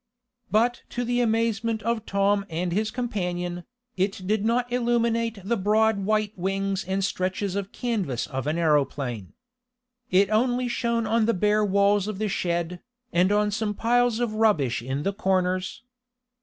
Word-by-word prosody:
But 235 +3 +2 0.2
to 245 - +1
the 245 +1 +1
amazement 225 -1 0
of 230 -1 -1
Tom 200 0 +2
and 170 +2 -2
his 215 +4 0
companion, 180 -8 -3 0.3
it 195 0 -1
did 210 +1 +1
not 240 +2 0
illuminate 235 -2 +1
the 230 +5 0
broad 215 +2 +2
white 215 +1 0
wings 195 +1 -1
and 190 +1 -1
stretches 185 +1 -2
of 200 -1 -3
canvas 195 - -2
of 135 0 -4
an 155 +2 0
aeroplane. 140 - 0 0.8
It 195 +2 +3
only 245 +3 +2
shone 235 -1 0
on 225 0 +2
the 230 - +2
bare 210 +3 +2
walls 200 0 +2
of 215 -2 -4
the 215 +1 -1
shed, 175 -1 -2 0.3
and 180 +3 +3
on 210 0 +2
some 210 -1 -2
piles 240 0 +2
of 240 -3 -1
rubbish 205 - +2
in 135 +4 -3
the 195 - 0
corners. 185 +1 -1
205 Hz, 155 wpm, -25 LUFS, 185-230 Hz, 0.8 s, It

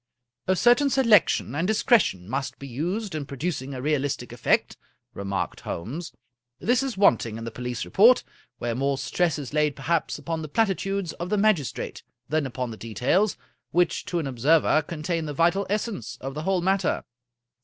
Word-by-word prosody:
" 120 +1 -62
A 185 - +3
certain 245 +8 +4
selection 230 - +4
and 165 +5 0
discretion 210 - +2
must 135 +4 -3
be 140 - -9
used 175 - -3
in 150 -3 -4
pro 140 - -8
ducing 140 -4 -3
a 130 - -6
realistic 140 -5 -1
effect," 120 - +1 0.4
remarked 100 0 -3
Holmes. 140 - -5 0.3
" 120 0 -60
This 245 +1 +4
is 270 -6 -3
want 195 - +5
ing 110 0 -6
in 115 - -7
the 115 - -5
police 125 +1 -4
report, 235 +6 +5 0.3
where 120 0 -2
more 135 +3 0
stress 165 +2 0
is 145 -2 -7
laid 150 -2 +2
perhaps 160 +4 -1
upon 165 -1 -4
the 155 - -5
platitudes 195 -2 0
of 175 +1 -4
the 210 - +1
magistrate 200 - 0 0.3
than 150 -1 0
upon 125 -1 -4
the 110 - -8
details, 125 - +1 0.3
which 175 -1 +1
to 180 - -2
an 165 - -1
observer 145 +5 +3
contain 160 +1 -3
the 150 - -4
vital 175 +5 +2
essence 210 - -3
of 135 +1 -5
the 150 - -4
whole 190 +2 +1
matter. 190 +1 +1
155 Hz, 185 wpm, -25 LUFS, 130-195 Hz, 0.4 s, want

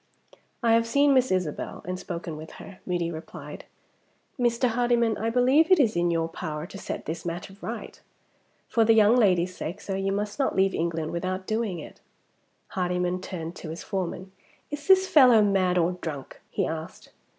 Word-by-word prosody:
"I 230 - +4
have 230 0 +3
seen 280 +3 +4
Miss 255 -1 +3
Isabel, 180 -5 -2
and 185 0 -3
spoken 170 -3 -5
with 155 +1 -9
her," 195 -2 -11
Moody 175 -2 -1
replied. 160 0 -9 0.7
"Mr. 240 +1 +2
Hardyman, 235 -1 +2
I 225 - -1
believe 255 +7 +4
it 370 -3 +6
is 230 -9 +3
in 175 0 +2
your 165 -1 0
power 155 -2 -5
to 195 - -10
set - - -5
this 160 +2 -5
matter 175 +3 -5
right. 230 0 -7 0.7
For 230 - +3
the 225 0 +5
young 215 +1 +6
lady's 185 -6 +3
sake, 175 +6 -5
sir, 195 - -4
you 195 0 -1
must 205 +4 -3
not 275 - +1
leave 190 0 +3
England 165 -1 -2
without 185 +2 -3
doing 215 -4 -1
it." 155 - -11 0.7
Hardyman 180 0 -1
turned 170 -3 -6
to 160 - -8
his 165 +2 -6
foreman. 190 -1 -4 0.4
"Is 290 0 -6
this 380 0 +6
fellow 255 - +7
mad 190 -3 +2
or 175 0 +3
drunk?" 160 -6 -7
he - - -1
asked. 160 +1 -6
190 Hz, 180 wpm, -26 LUFS, 170-230 Hz, 0.7 s, fellow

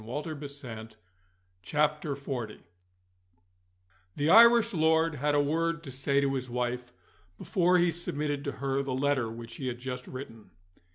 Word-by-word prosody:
CHAPTER 150 +7 -4
XL 140 -6 -8 0.9
DIRE 150 0 +2
NECESSITY 130 -6 -6 1.5
THE 145 +2 0
Irish 235 0 +7
lord 160 0 +3
had 145 +2 +1
a - - +4
word 165 +3 0
to 135 - -8
say 135 +2 +1
to 140 -1 +1
his 130 -2 -3
wife, 125 0 -3 0.5
before 180 0 +2
he 175 -1 +3
submitted 150 -3 -3
to 140 - -2
her 135 0 -1
the 135 -2 -3
letter 135 -3 +1
which 115 0 -9
he 130 - -4
had 120 -1 -3
just 125 0 -6
written. 115 -6 -9
140 Hz, 150 wpm, -29 LUFS, 125-155 Hz, 1.5 s, Irish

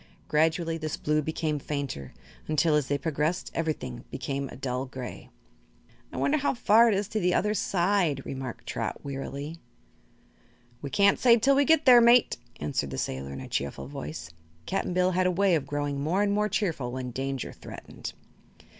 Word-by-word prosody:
Gradually 165 +2 +1
this 155 -1 -3
blue 150 0 +1
became 155 0 -2
fainter, 140 - -4 0.4
until, 155 +1 +2
as 150 -3 +2
they 145 - +1
progressed, 155 +3 -1
everything 150 -7 -3
became 140 -1 -3
a - - -9
dull 130 0 -3
gray. 130 -1 -8 0.8
"I - - -7
wonder 305 - +2
how 280 - 0
far 230 0 +5
it 220 - +3
is 200 0 -1
to 220 - -1
the 180 -2 +2
other 210 0 +2
side," 175 -7 +1
remarked 130 -3 -6
Trot, - - -4
wearily. 140 +3 -5 1.2
"We 140 - -5
can't 200 +7 +4
say 240 -2 +6
till 270 +5 +4
we 285 +1 +4
get 320 0 +4
there, 245 -3 +9
mate," 235 +1 +5 0.2
answered 75 -1 -2
the 65 - -5
sailor 65 +1 -3
in 70 - -6
a - - -8
cheerful 70 0 -3
voice. 80 +4 -7 0.3
Cap'n 185 -1 -2
Bill 180 0 +3
had 185 0 +2
a - - +2
way 190 +1 +3
of 155 -5 0
growing 145 -1 -2
more 175 +8 +1
and 205 - +1
more 210 +1 +1
cheerful 170 - -1
when 125 0 -4
danger 135 +1 -3
threatened. - - -9
155 Hz, 180 wpm, -28 LUFS, 135-195 Hz, 1.2 s, there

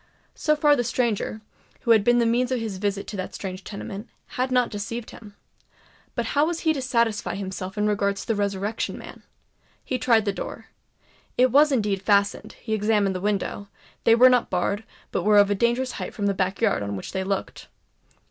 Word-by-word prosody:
So 305 - +1
far 295 -1 +4
the 245 - 0
stranger, 230 -2 -1 0.4
who 235 - +1
had 220 -3 +6
been 240 +2 +4
the 235 - +3
means 245 +2 +1
of 255 - +1
his 215 -4 -4
visit 200 0 -1
to 205 - -7
that 185 - -5
strange 190 -1 -6
tenement, 200 +1 -7 0.2
had 255 +1 -2
not 250 -1 +2
deceived 220 +3 -5
him. 210 -3 -13 0.8
But 235 -2 -1
how 295 +2 +3
was 335 -1 -2
he 320 -1 +2
to 275 - -3
satisfy 235 -4 0
himself 190 0 -5
in 210 - +1
regard 200 -1 +1
to - - -7
the 225 - 0
Resurrection 205 +1 -2
Man? - - -11 0.6
He 255 - -2
tried 225 -2 +3
the 200 - 0
door—it 250 +5 -4
was 295 +3 +5
indeed 210 -7 0
fastened; 200 0 +1
he 220 - -5
examined 210 -2 +1
the 185 - -3
windows—they 205 +2 -1
were 250 +2 +8
not 250 -1 +3
barred, 200 +4 -1 0.3
but - - 0
were 210 0 +4
of 205 0 +5
a - - +5
dangerous 240 +4 +1
height - - -6
from 205 - -2
the 200 - +2
back 190 +1 -2
yard 215 - +2
on 100 0 -3
which 95 - -6
they 190 0 -2
looked. 195 0 -4
215 Hz, 200 wpm, -24 LUFS, 200-240 Hz, 0.8 s, were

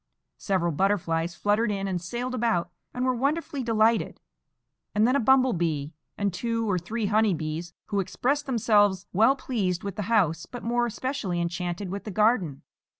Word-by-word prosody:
Several 185 -4 0
butterflies 170 -1 0
fluttered 210 +4 +1
in 195 -1 -2
and 180 -3 -2
sailed 240 +8 -4
about 220 -8 0 0.2
and 250 +1 -2
were 255 - +2
wonderfully 280 +3 -1
delighted, 225 -1 +2 0.8
and 215 +2 +4
then 255 - +2
a - - +3
bumble 260 0 +4
bee 160 -3 -1 0.2
and 200 -2 0
two 230 +3 -1
or 185 -3 +1
three 215 +6 -3
honey 215 -2 +3
bees, 160 +2 -5
who 205 -2 0
expressed 270 +10 -1
themselves 205 -6 +3
well 225 +8 +5
pleased 200 -10 -2
with 200 0 -5
the - - -1
house, 170 -8 +2
but 245 - -8
more 240 +1 +1
especially 230 -6 -3
enchanted 175 +2 -3
with 200 +1 -4
the - - -4
garden. 200 - +1
205 Hz, 170 wpm, -26 LUFS, 175-235 Hz, 0.8 s, well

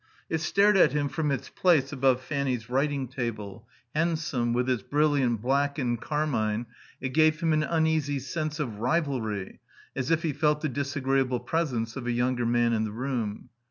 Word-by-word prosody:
It 160 - +1
stared 200 +5 +3
at 150 -7 +5
him 145 -1 0
from 155 +1 -1
its 140 - -2
place 155 -6 +2
above 130 -1 +2
Fanny's 130 -5 -2
writing 140 0 0
table; 115 -4 -5 0.3
handsome, 155 -7 0
with 125 +1 0
its 125 -4 +1
brilliant 140 -4 +1
black 140 +3 +1
and 120 -4 -1
carmine, 120 -8 -1 0.3
it 130 - -3
gave 155 +2 +3
him 165 -2 +1
an 155 - +2
uneasy 160 -3 +1
sense 155 +3 -3
of 115 -8 -3
rivalry, 120 - -1 0.4
as 130 -1 -2
if 165 +1 +2
he 160 -3 0
felt 150 +1 +1
the 155 - -1
disagreeable 135 -2 0
presence 120 -5 -2
of 125 -2 -5
a - - +1
younger 120 0 0
man 120 0 +2
in 110 -1 +1
the 110 - -3
room. 115 -3 -3
135 Hz, 175 wpm, -27 LUFS, 120-155 Hz, 0.4 s, at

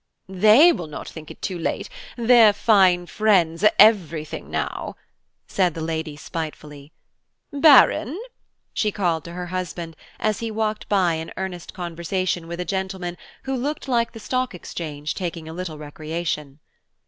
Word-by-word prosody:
"They 215 - +6
will 175 - -4
not 150 - -8
think 155 -2 -10
it - - -12
too 185 -3 -3
late–their 235 - +2
fine 190 -5 +4
friends 180 -4 +2
are 210 - +8
everything 170 -8 +3
now," - - -3 0.5
said 180 -4 +1
the - - -5
lady 160 -2 -3
spitefully. 150 -2 -7 0.6
"Baron!" 285 - +5 0.5
she 210 - 0
called 175 -6 -1
to 170 - -8
her 180 0 -5
husband, 175 -3 -4 0.2
as 215 -2 0
he 230 - -3
walked 215 0 -2
by 185 -4 +3
in 160 0 -5
earnest 185 -3 -6
conversation 175 0 -3
with 170 +1 -6
a 180 - -2
gentleman 190 -1 -3 0.3
who 265 0 -2
looked 280 +3 -3
like 235 -3 +1
the 225 - -9
Stock 255 +2 -2
Exchange 150 -4 -5
taking 170 -3 -5
a 160 - -7
little 170 -3 -5
recreation. 150 -1 -5
180 Hz, 150 wpm, -23 LUFS, 160-215 Hz, 0.6 s, are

